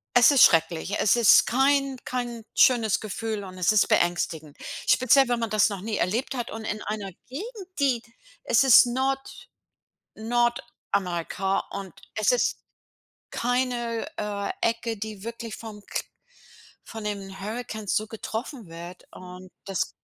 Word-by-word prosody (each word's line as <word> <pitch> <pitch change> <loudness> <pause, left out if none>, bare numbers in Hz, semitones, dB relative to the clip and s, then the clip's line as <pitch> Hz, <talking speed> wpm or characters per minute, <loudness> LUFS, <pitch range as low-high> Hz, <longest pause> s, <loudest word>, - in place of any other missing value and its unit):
es 245 +3 +7
ist 275 - +7
schrecklich, 165 +4 +3
es 210 - +4
ist 235 -3 +6
kein 275 +2 +2
kein 240 -2 -4
schönes 230 -5 +4
Gefühl 215 0 -4
und 185 -1 -10
es 180 +2 +3
ist 215 - +4
beängstigend. 160 -3 0 0.3
Speziell, 265 0 +5
wenn 240 -1 +1
man 230 -2 -2
das 215 0 +3
noch 200 -2 -5
nie 215 0 -3
erlebt 230 +9 -1
hat 240 -1 -4
und 220 0 -7
in 215 0 -3
einer 205 -2 -4 0.2
Gegend, 385 - -7
die 265 -5 +2 0.4
es - - +4
ist 255 -1 +8
Nord 265 +2 -2 0.7
Nordamerika, 200 -6 -1
und 195 -1 -7 0.2
es - - +2
ist - - +1 0.7
keine, 245 -1 -1
äh, 205 -1 -3
Ecke, 230 0 -1
die 215 -2 -6
wirklich 230 -1 -6
vom 215 -2 -9
Kr - - -3 0.8
von 220 -1 -8
den 195 -2 -5
Hurrikans 220 -1 -4
so 215 - 0
getroffen 225 - -6
wird, 170 +2 -10
und 180 0 -11 0.2
das 195 -3 -1
220 Hz, 145 wpm, -26 LUFS, 200-245 Hz, 0.8 s, ist